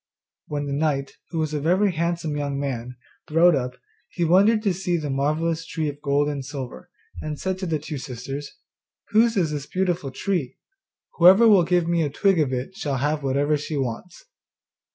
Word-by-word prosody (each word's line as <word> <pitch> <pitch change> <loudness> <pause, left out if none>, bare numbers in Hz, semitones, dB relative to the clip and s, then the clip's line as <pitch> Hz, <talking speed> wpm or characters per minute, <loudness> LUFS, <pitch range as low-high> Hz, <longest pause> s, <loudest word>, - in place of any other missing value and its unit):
When 145 -1 -3
the 140 - -3
knight, 140 -2 -1
who 165 - -5
was 155 -1 -1
a 150 - 0
very 185 +6 +3
handsome 170 -2 -2
young 140 -1 -2
man, 125 -3 -4 0.3
rode 170 +3 +5
up, 125 -2 -2 0.4
he 175 - -2
wondered 200 +6 +4
to 200 -4 +2
see 175 -1 -1
the 150 -3 -3
marvellous 155 +4 0
tree 160 -1 -3
of 145 0 -9
gold 145 0 +1
and 145 -2 -3
silver, 130 - -7 0.3
and 150 -1 -5
said 190 0 -2
to 185 - -3
the 160 -2 0
two 150 -1 -6
sisters, 135 +2 -6 0.6
'Whose 225 +1 +3
is 165 -5 +1
this 150 -1 -4
beautiful 180 -5 -1
tree? 155 -1 -2 0.6
Whoever 190 +7 +8
will 200 -5 +6
give 175 -1 +2
me 170 0 +1
a 150 - 0
twig 190 +5 +2
of 145 -4 +1
it 130 +9 -4
shall 145 -10 -2
have 150 +3 0
whatever 140 +2 +1
she 145 +1 -4
wants. 135 - -5
155 Hz, 190 wpm, -24 LUFS, 140-175 Hz, 0.6 s, Whoever